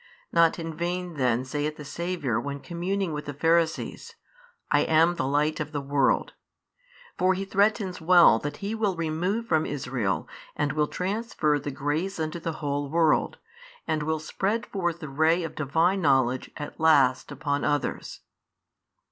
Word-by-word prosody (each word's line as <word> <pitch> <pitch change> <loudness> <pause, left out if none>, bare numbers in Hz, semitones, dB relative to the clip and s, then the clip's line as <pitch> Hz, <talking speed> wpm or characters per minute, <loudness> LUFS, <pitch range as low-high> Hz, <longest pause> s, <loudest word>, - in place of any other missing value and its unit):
Not 165 -1 +4
in 165 -1 -5
vain 175 +1 -3
then 125 -3 +1
saith 150 +3 -2
the 150 - -9
Saviour 165 -6 -2
when 140 0 -5
communing 180 +2 -2
with 150 0 -5
the 145 - -6
Pharisees, 165 +2 0 0.6
I - - +5
am 160 +2 +4
the 170 -7 -2
Light 150 +2 +1
of 150 0 -4
the 145 - -1
world, 140 -1 +1 0.9
for 185 +1 +3
He 195 +1 -3
threatens 200 -2 +1
well 170 -8 +6
that 145 +4 -5
He 210 - -2
will 210 -4 0
remove 170 +7 -1
from 160 -7 +1
Israel 125 -8 -2 0.3
and 145 0 0
will 150 -1 +1
transfer 180 -6 -1
the 145 - -5
grace 150 +7 -2
unto 160 +2 -3
the 165 0 -3
whole 145 0 -1
world, 160 0 +2 0.5
and 155 -1 -1
will 160 +1 0
spread 205 +7 -2
forth 175 -4 -3
the 155 - -5
ray 160 +5 +2
of 165 - -5
Divine 165 +6 +1
knowledge 130 -4 +2
at 145 - -7
last 140 -5 +4
upon 145 -1 -2
others. 145 -1 -2
160 Hz, 160 wpm, -26 LUFS, 145-175 Hz, 0.9 s, well